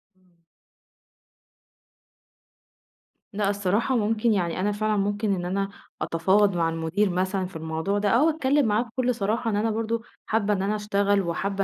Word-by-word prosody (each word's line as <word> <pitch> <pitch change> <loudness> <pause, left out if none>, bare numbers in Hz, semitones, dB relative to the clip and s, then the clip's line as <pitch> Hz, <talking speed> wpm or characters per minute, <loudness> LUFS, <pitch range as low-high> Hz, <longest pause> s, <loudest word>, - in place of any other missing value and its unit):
إمم. 185 -2 -32 3.0
لأ 200 0 0
الصراحة 205 +5 0
ممكن 225 +1 +1
يعني، 175 -3 -1
أنا 205 +3 +1
فعلًا 215 +1 0
ممكن 205 +1 0
إن 175 -1 -4
أنا 195 +2 -1 0.3
أتفاوض 190 +4 +2
مع 165 -1 +2
المدير 165 +5 0
مثلًا 185 +1 -1
في 185 - -10
الموضوع 160 +5 -2
ده، 205 0 +1
أو 255 +10 +4
أتكلم 290 -2 +2
معاه 215 0 +2
بكل 250 +1 -1
صراحة، 225 +2 -1
إن 210 - 0
أنا 220 +2 +1
برضه 225 +1 -2 0.2
حابة 210 -1 +1
إن 190 - -1
أنا 205 +2 0
أشتغل 205 -1 +1
وحابة 195 +3 -2
205 Hz, 155 wpm, -25 LUFS, 185-220 Hz, 3.0 s, أو